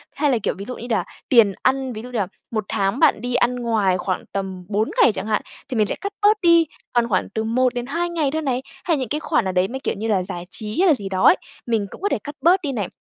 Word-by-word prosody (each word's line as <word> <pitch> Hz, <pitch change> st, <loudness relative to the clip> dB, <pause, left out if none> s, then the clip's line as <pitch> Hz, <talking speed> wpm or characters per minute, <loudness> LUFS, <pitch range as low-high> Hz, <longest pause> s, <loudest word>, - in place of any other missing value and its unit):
Hay 295 Hz, -2 st, +2 dB
là, 250 Hz, -, +3 dB
kiểu, -, -, +1 dB
ví 200 Hz, -, -7 dB
dụ 250 Hz, +2 st, -5 dB
đi 240 Hz, -, -8 dB
đà 225 Hz, -3 st, +1 dB, 0.3 s
tiền 225 Hz, -6 st, +6 dB
ăn, 265 Hz, -1 st, +1 dB
ví 215 Hz, -, -6 dB
dụ 250 Hz, -, -9 dB
như 245 Hz, -, -3 dB
là 200 Hz, -4 st, 0 dB, 0.2 s
1 215 Hz, -3 st, -2 dB
tháng 195 Hz, +5 st, 0 dB
bạn 315 Hz, -9 st, +4 dB
đi 245 Hz, 0 st, -2 dB
ăn 250 Hz, +1 st, +2 dB
ngoài 220 Hz, -6 st, +1 dB
khoảng 185 Hz, 0 st, -2 dB
tầm 190 Hz, -2 st, -4 dB
4 215 Hz, +2 st, 0 dB
ngày -, -, +7 dB
chẳng 190 Hz, +2 st, -5 dB
hạn, 215 Hz, -1 st, +1 dB, 0.3 s
thì 250 Hz, -, -2 dB
mình 215 Hz, -1 st, +3 dB
sẽ -, -, -2 dB
cắt 400 Hz, -, -3 dB
bớt 420 Hz, +1 st, +5 dB
đi, 335 Hz, -1 st, +5 dB, 0.3 s
còn 240 Hz, -1 st, +2 dB
khoảng 185 Hz, -4 st, +1 dB
từ 220 Hz, -, 0 dB
1-2 255 Hz, +8 st, 0 dB
ngày 320 Hz, -5 st, 0 dB
thôi 315 Hz, +2 st, -1 dB
này. 260 Hz, -4 st, -1 dB, 0.2 s
Hay 330 Hz, -3 st, +1 dB
những 260 Hz, -4 st, -3 dB
cái 300 Hz, -, -1 dB
khoản 310 Hz, -5 st, +1 dB
nào 190 Hz, -, 0 dB
đấy, 180 Hz, 0 st, +2 dB
mấy 265 Hz, +6 st, -5 dB
kiểu -, -, -2 dB
như 220 Hz, +2 st, -3 dB
là 205 Hz, -4 st, +2 dB
giải 180 Hz, -2 st, -6 dB
trí 215 Hz, -, -5 dB
hay 380 Hz, -, +5 dB
là 320 Hz, -, +7 dB
gì 200 Hz, -8 st, -4 dB
đó 190 Hz, -1 st, -1 dB
ấy, -, -, +8 dB, 0.3 s
mình 225 Hz, -3 st, +1 dB
cũng -, -, -11 dB
có 405 Hz, -, +1 dB
thể -, -, +1 dB
cắt 290 Hz, 0 st, -7 dB
bớt 365 Hz, +3 st, +5 dB
đi 290 Hz, -5 st, -2 dB
này. 210 Hz, -8 st, -2 dB
240 Hz, 290 wpm, -22 LUFS, 205-285 Hz, 0.3 s, ấy